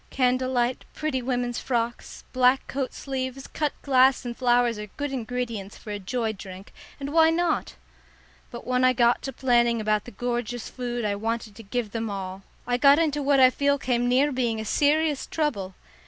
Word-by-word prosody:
Candle 255 0 +1
light, 245 0 0
pretty 305 -4 -2
women's 245 -1 -2
frocks, 240 -1 -3
black 255 +1 +3
coat 265 -1 -3
sleeves, 265 -1 -5
cut 300 -2 -2
glass 260 -2 +4
and 240 -1 -4
flowers 240 -3 +2
are 210 - -6
good 290 -1 -3
ingredients 230 -5 -4
for 210 - -9
a 205 - -4
joy 220 +3 -2
drink, 190 -1 -11 0.3
and 280 +1 -5
why 320 -1 +6
not? 335 0 0 0.7
But 240 - -9
when 250 0 +1
I 255 0 +5
got 240 -1 +3
to 270 - -4
planning 240 -3 +2
about 215 -1 0
the 245 - -9
gorgeous 240 +1 -3
food 245 -2 -3
I 205 - +1
wanted 220 0 -3
to 225 - -10
give 225 0 -3
them 225 0 -3
all, 190 -1 -5 0.2
I 245 0 0
got 280 +2 +6
into 300 -3 +1
what 280 0 +3
I 255 -1 +7
feel 280 +1 +1
came 245 -2 0
near 270 +4 +3
being 240 -4 -1
a 220 - -4
serious 295 +4 +1
trouble. 200 - -2
245 Hz, 185 wpm, -25 LUFS, 230-270 Hz, 0.7 s, I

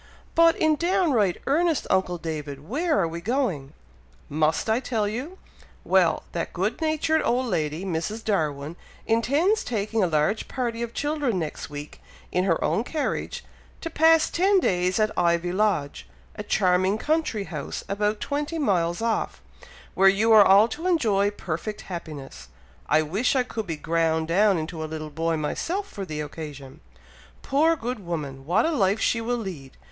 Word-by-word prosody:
"But 335 0 +5
in 310 -1 +2
downright 325 - +2
earnest, 325 +1 +1
uncle 180 -2 +1
David! 150 -3 -6
where 310 - +1
are 170 - +2
we 165 +1 -6
going?" 195 - -1 0.6
"Must 155 +5 +1
I 220 +2 +2
tell 225 -5 -1
you? 260 - -5 0.5
Well! - - +3
that - - -4
good - - -2
natured 315 0 +1
old 250 +2 +1
lady, 160 -4 -2
Mrs. 190 +5 -3
Darwin, 155 -5 -1 0.3
intends 285 - +2
taking 220 -1 -1
a - - +3
large 155 +7 0
party 235 -3 -3
of 235 0 -5
children 290 -7 -1
next 160 -4 -4
week, 145 0 -9 0.3
in 180 +1 +1
her 170 -4 +1
own 220 - +1
carriage, 300 +3 -3 0.4
to 330 - -5
pass 320 0 +5
ten 385 +3 +3
days 180 - +1
at 215 0 +2
Ivy 170 0 +1
Lodge, 185 -7 -1 0.3
a - - -5
charming 190 -1 +2
country 300 -6 0
house 150 -7 -6
about 210 +1 -1
twenty 295 +3 -3
miles 180 - 0
off, 230 -1 -1 0.5
where 195 0 +6
you 210 +4 +2
are 215 -2 +9
all 200 +3 +6
to 325 +9 -4
enjoy 215 - +2
perfect 205 +1 -5
happiness. 145 - -8 0.4
I 155 +1 +4
wish 200 - 0
I 255 - +3
could 225 -4 -5
be 165 -2 -3
ground 160 0 0
down 195 +2 +4
into 160 0 -4
a 155 - -5
little 155 -1 -6
boy 165 +2 -1
myself, 345 - -2
for 200 - -6
the 155 -3 -4
occasion! 145 -3 -8 0.6
Poor 315 +4 +3
good 245 -6 -5
woman! 145 -6 -5
what 195 +7 +3
a 330 - +1
life 200 - +2
she 230 - +1
will 240 +2 -1
lead! 175 - -7
200 Hz, 165 wpm, -25 LUFS, 165-255 Hz, 0.6 s, are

